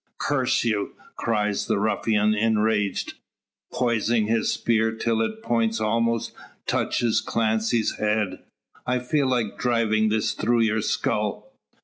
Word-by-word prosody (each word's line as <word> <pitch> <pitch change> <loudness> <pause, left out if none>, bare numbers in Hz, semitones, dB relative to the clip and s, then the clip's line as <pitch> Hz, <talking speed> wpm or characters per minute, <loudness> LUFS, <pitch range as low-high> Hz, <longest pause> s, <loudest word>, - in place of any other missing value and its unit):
"Curse - - +1
you!" 105 -4 -1 0.2
cries 105 -3 -1
the - - +1
ruffian 105 0 +1
enraged, 110 -2 0 0.6
poising 115 -2 +1
his 110 +1 +1
spear 110 -1 +1
till 115 0 0
its 220 - -2
point 115 -1 +1
almost 115 +1 0 0.3
touches 120 -2 +1
Clancy's 110 0 0
head, 105 -2 0 0.5
"I 125 0 +2
feel 135 +3 0
like 120 -5 -1
driving 110 -3 +2
this 110 +1 +1
through 115 +2 +1
your 110 -1 +1
skull." - - -2
110 Hz, 120 wpm, -24 LUFS, 110-115 Hz, 0.6 s, I